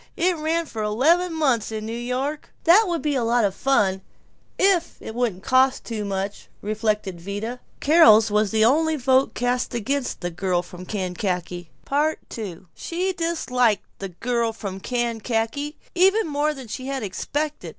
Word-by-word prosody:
It 360 +2 +2
ran 325 +2 -1
for 225 -7 -6
eleven 305 +12 +2
months 270 -10 +1
in 215 -1 -4
New 220 - -5
York!" 255 +5 -3
"That 385 +7 +6
would 340 -2 -2
be 290 -3 +1
lots 235 -1 +2
of 195 - 0
fun, 195 -7 +1 0.6
if 370 -3 +2
it 220 - -8
wouldn't 225 -6 -1
cost 260 +1 +3
too 220 -3 -4
much," 195 0 -4 0.2
reflected 210 -4 -1
Vida. 205 +6 -5 0.2
Carol's 280 -9 +6
was 210 0 +2
the 220 +1 +3
only 315 +6 +3
vote 260 -1 +2
cast 245 0 -1
against 260 +4 -2
"The 175 -1 -3
Girl 175 0 0
from 180 0 -11
Kankakee." 180 -3 -3 0.7
II 190 -7 -6
She 365 +3 -2
disliked 255 - +1
"The 195 - -5
Girl 230 +5 -1
from 200 -4 -6
Kankakee" 240 +5 -2 0.2
even 385 +5 +4
more 300 0 0
than 265 -3 -9
she 255 +4 -6
had 270 -3 -3
expected. 290 +10 -3
240 Hz, 155 wpm, -23 LUFS, 210-295 Hz, 0.7 s, That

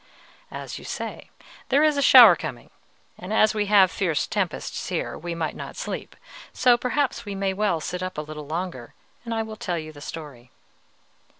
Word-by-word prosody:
"As - - -7
you - - -13
say, - - -6 0.4
there 280 +3 +4
is 305 -1 +4
a 280 - +1
shower 240 -9 +9
coming, 120 -6 -7 0.5
and 180 +3 -7
as 215 0 +4
we 210 -1 -1
have 195 -3 +5
fierce 170 -6 0
tempests - - -3
here, - - -3
we 170 0 -5
might 160 -2 -3
not - - -8
sleep; - - -6 0.4
so 250 -1 +4
perhaps 250 0 -1
we 205 -3 -6
may 195 0 0
as 190 - -7
well 200 -6 +1
sit 180 +3 -5
up 185 -2 -5
a - - -1
little 150 -1 -8
longer, 165 -6 -5 0.3
and 230 - -5
I 225 -1 0
will 220 0 -8
tell 175 -4 -3
you 155 -1 -6
the 145 - -13
story." 145 -6 -9
185 Hz, 195 wpm, -24 LUFS, 160-225 Hz, 0.5 s, shower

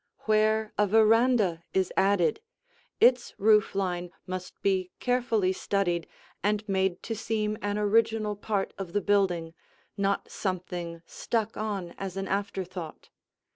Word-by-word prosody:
Where 215 0 +2
a 210 - +4
veranda 220 -4 +4
is 190 -1 +1
added, 195 - +3 0.6
its 245 0 +4
roof 210 -1 +4
line 180 -2 -1 0.2
must 185 0 -6
be 190 -2 +1
carefully 240 -6 +1
studied 180 -4 -1 0.3
and 210 +2 0
made 190 -2 0
to 225 - -3
seem 215 -1 -1
an 205 0 -1
original 215 0 +2
part 205 -1 -2
of 180 -3 -6
the 205 - +1
building, 180 -6 +1 0.4
not 200 0 0
something 175 -3 -4
stuck 225 +3 -2
on 200 -5 -3
as 195 -1 -5
an 195 0 -3
afterthought. 190 -4 -4
200 Hz, 130 wpm, -28 LUFS, 185-215 Hz, 0.6 s, a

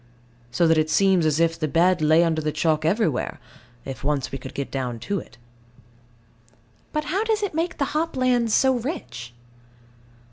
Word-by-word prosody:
So 170 +8 +1
that 160 -1 +4
it 155 0 0
seems 190 -2 +3
as 155 0 +1
if 165 0 +1
the 155 - 0
bed 170 +4 +2
lay 155 +2 +5
under 160 -2 0
the 155 0 -1
chalk 155 0 0
everywhere, 165 - 0 0.5
if 135 - -7
once 145 -2 -1
we 135 - -5
could 130 - -10
get 140 - -4
down 125 -3 -3
to 200 - -2
it. 130 - -14 1.5
But 305 - -1
how 370 +8 -1
does 440 -2 0
it 400 - -2
make 330 +3 -2
the 280 - +1
hop 320 -1 -1
lands 245 -3 +2
so 265 +4 +4
rich? 170 - -6
165 Hz, 180 wpm, -23 LUFS, 150-255 Hz, 1.5 s, lay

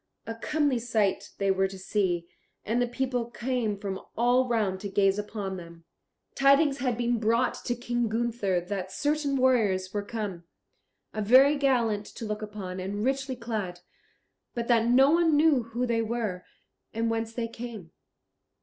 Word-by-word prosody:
A 225 - -4
comely 285 +2 0
sight 220 -4 0
they 195 -1 +2
were 190 0 +2
to 190 0 -9
see, 185 -3 -1 0.4
and 230 +4 +1
the 245 - +2
people 245 -1 -2
came 240 -4 -2
from 195 -1 -5 0.2
all 245 +2 +3
round 210 -6 0
to 200 - -5
gaze 195 0 +2
upon 205 -2 -4
them. 170 -1 -11 0.5
Tidings 275 +1 +4
had 250 -3 0
been 240 -1 0
brought 230 +3 +2
to 240 - 0
King 240 -1 -1
Gunther 220 -5 0
that 190 +1 -4
certain 290 -1 0
warriors 215 -8 +2
were 205 - -1
come, 200 -5 -5 0.7
very 255 +7 +5
gallant 235 -7 +1
to 230 - -8
look 210 0 -3
upon 205 -3 -6
and 200 +4 -3
richly 270 0 -1
clad, 215 -7 -4 0.7
but 235 -1 -2
that 230 -1 +4
no 265 +4 +6
one 330 -2 +4
knew 300 -4 +4
who 235 +2 -2
they 230 -2 +1
were, 220 -5 -3 0.5
and 230 0 0
whence 225 0 -2
they 230 0 -2
came. 230 -7 -8
230 Hz, 160 wpm, -28 LUFS, 200-245 Hz, 0.7 s, no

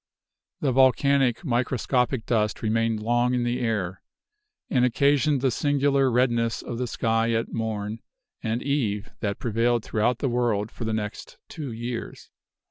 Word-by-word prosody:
The 140 - +2
volcanic, 135 +1 +3
microscopic 125 -1 0
dust 110 -2 0
remained 115 0 0
long 120 +2 +2
in 125 - 0
the 120 +1 -1
air, 105 -7 -2 0.7
and 125 -2 +2
occasioned 140 +2 +3
the 130 -1 +2
singular 140 0 +2
redness 120 -2 +1
of 120 -1 -5
the 125 - -1
sky 115 0 0
at 115 0 -1
morn 110 -1 -3 0.4
and 110 +2 -2
eve 110 -8 -1
that 100 -2 -2
prevailed 115 0 0
throughout 110 +3 +1
the 135 - -1
world 120 -4 0
for 120 - -6
the 110 - -1
next 105 -1 -5
two 145 -5 -6
years. 120 +1 -6
120 Hz, 145 wpm, -25 LUFS, 110-130 Hz, 0.7 s, volcanic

